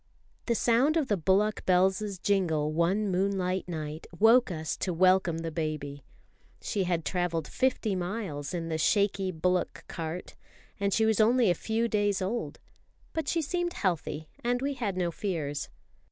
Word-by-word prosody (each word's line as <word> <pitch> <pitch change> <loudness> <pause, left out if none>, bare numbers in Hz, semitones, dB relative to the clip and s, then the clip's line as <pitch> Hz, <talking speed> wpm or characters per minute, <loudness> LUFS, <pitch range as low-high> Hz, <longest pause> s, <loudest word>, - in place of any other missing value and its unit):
The 235 - +2
sound 250 +8 +3
of 300 -5 0
the 205 - +3
bullock 195 +4 +1
bells' 190 +2 +2
jingle 170 -6 +1
one 185 +6 +1
moonlight 185 -1 0
night 155 -2 -5
woke 230 +4 +5
us 160 -3 -3
to 185 - -2
welcome 185 -1 +3
the 165 0 -4
baby. 150 -3 -4 0.6
She 195 -2 -1
had 170 -3 -1
travelled 175 -4 -1
fifty 255 -6 0
miles 180 -6 -4
in 170 -2 -3
the 160 -1 -2
shaky 195 +1 +2
bullock 180 +2 -1
cart, 165 +1 -6 0.4
and 200 0 +1
she 220 +3 +3
was 220 -1 +2
only 235 -2 +4
a - - +4
few 225 +6 -1
days 205 -3 +1
old; 200 +5 -3 0.6
but 320 -3 -2
she 330 -2 +1
seemed 350 +3 -1
healthy, 160 -4 -2 0.2
and 245 +1 +1
we 280 +2 -1
had 215 -8 -3
no 175 -2 0
fears. 155 -7 -3
190 Hz, 160 wpm, -29 LUFS, 165-220 Hz, 0.6 s, woke